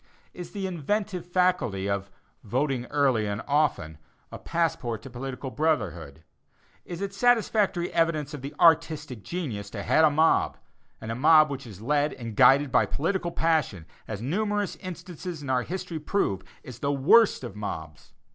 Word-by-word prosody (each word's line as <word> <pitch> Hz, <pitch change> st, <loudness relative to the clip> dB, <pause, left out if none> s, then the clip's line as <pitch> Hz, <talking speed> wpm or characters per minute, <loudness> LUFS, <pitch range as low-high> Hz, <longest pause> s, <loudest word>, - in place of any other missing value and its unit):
Is 175 Hz, -2 st, -8 dB
the 200 Hz, -2 st, -5 dB
"inventive 185 Hz, +1 st, -2 dB
faculty" 175 Hz, -, +1 dB
of 100 Hz, 0 st, -2 dB, 0.3 s
"voting 125 Hz, +2 st, -1 dB
early 135 Hz, -7 st, +1 dB
and 100 Hz, +2 st, -3 dB
often," 140 Hz, -, 0 dB, 0.3 s
a -, -, -8 dB
passport 130 Hz, -10 st, -2 dB
to 135 Hz, -, -10 dB
political 130 Hz, +1 st, -6 dB
brotherhood? 85 Hz, -, -2 dB, 0.6 s
Is 175 Hz, +1 st, -7 dB
it 200 Hz, 0 st, -3 dB
satisfactory 210 Hz, -5 st, +2 dB
evidence 155 Hz, -3 st, 0 dB
of 145 Hz, -3 st, -7 dB, 0.2 s
"artistic" 155 Hz, -7 st, +3 dB
genius, 115 Hz, -, -5 dB
to 100 Hz, -1 st, -6 dB
head 160 Hz, -, +3 dB
a 155 Hz, -, +7 dB
mob? 155 Hz, +2 st, +2 dB, 0.4 s
and 110 Hz, -, -6 dB
a -, -, -3 dB
mob 155 Hz, +3 st, +5 dB
which 135 Hz, -2 st, -6 dB
is 105 Hz, -3 st, -11 dB
led 145 Hz, +4 st, +1 dB
and 115 Hz, -3 st, -7 dB
guided 140 Hz, +4 st, +5 dB
by -, -, +3 dB
political 175 Hz, +3 st, -1 dB
passion, 155 Hz, -, 0 dB, 0.2 s
as 110 Hz, 0 st, -5 dB
numerous 205 Hz, -, -1 dB
instances 175 Hz, -3 st, -7 dB
in 135 Hz, -, -3 dB
our 125 Hz, -1 st, +2 dB
history 180 Hz, +2 st, -5 dB
prove, 150 Hz, -, -1 dB, 0.2 s
is 125 Hz, -5 st, -10 dB
the 140 Hz, -, 0 dB
worst 155 Hz, +9 st, +4 dB
of 120 Hz, -5 st, -7 dB
mobs. 80 Hz, -8 st, -7 dB
145 Hz, 155 wpm, -26 LUFS, 115-175 Hz, 0.6 s, a